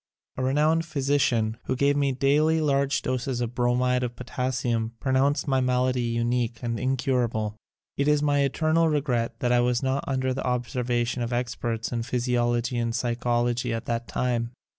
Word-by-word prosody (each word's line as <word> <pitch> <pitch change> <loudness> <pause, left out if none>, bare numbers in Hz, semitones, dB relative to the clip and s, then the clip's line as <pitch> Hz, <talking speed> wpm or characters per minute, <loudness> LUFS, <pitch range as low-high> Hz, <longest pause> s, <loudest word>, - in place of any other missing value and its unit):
A 130 - -3
renowned 150 +5 +2
physician 135 -7 0
who 130 - -1
gave 140 +2 +2
me 140 -1 +2
daily 150 +5 +2
large 140 -2 +1
doses 130 0 -2
of 120 -1 -2
Bromid 125 +1 +1
of 120 -1 -3
Potassium 125 -2 -2
pronounced 135 +3 +1
my 135 -2 +2
malady 125 0 +1
unique 120 0 0
and 115 -1 -2
incurable. 125 -5 0 0.4
It 140 - +1
is 150 0 +3
my 145 -1 +2
eternal 155 +4 +2
regret 135 -6 0
that 120 - +1
I 125 - +4
was 125 +1 +1
not 135 +1 0
under 130 -1 0
the 135 - -4
observation 125 -1 -1
of 120 0 -2
experts 120 -2 -2
in 120 -1 -1
physiology 120 0 0
and 115 -1 -1
psychology 120 0 0
at 115 - -5
that 115 0 -2
time. 120 -1 -1
125 Hz, 160 wpm, -26 LUFS, 120-135 Hz, 0.4 s, I